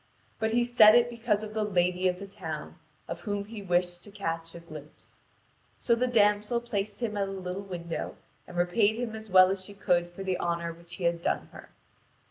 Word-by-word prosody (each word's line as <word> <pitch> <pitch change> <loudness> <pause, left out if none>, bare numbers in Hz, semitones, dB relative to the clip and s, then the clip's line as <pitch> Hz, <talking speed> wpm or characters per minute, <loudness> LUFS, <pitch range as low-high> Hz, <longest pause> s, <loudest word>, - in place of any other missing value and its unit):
But 220 0 +1
he 240 +2 +2
said 225 -3 +7
it 240 0 +4
because 225 -3 0
of 215 0 -7
the 215 0 0
lady 180 -2 +1
of 180 0 0
the 200 - -7
town, 160 -6 -7 0.3
of 170 +1 -5
whom 205 +1 -3
he 215 0 -8
wished 175 -2 0
to - - -12
catch 165 -5 -4
a - - -7
glimpse. 155 -3 -13 0.6
So 235 - +2
the 245 +2 +2
damsel 210 0 +3
placed 210 -2 -3
him 220 -3 -1
at 200 -1 0
a - - -5
little 190 0 -4
window, 170 -4 -5 0.3
and 175 - -9
repaid 205 +5 +3
him 230 -1 -3
as 220 0 -9
well 185 0 +7
as 195 -1 -3
she 200 +1 -10
could 175 -3 +1
for 175 +3 -8
the 185 -2 -1
honour 170 -1 -1
which 170 +1 -11
he 185 - -7
had 170 0 +1
done - - -1
her. - - -12
195 Hz, 215 wpm, -29 LUFS, 175-215 Hz, 0.6 s, said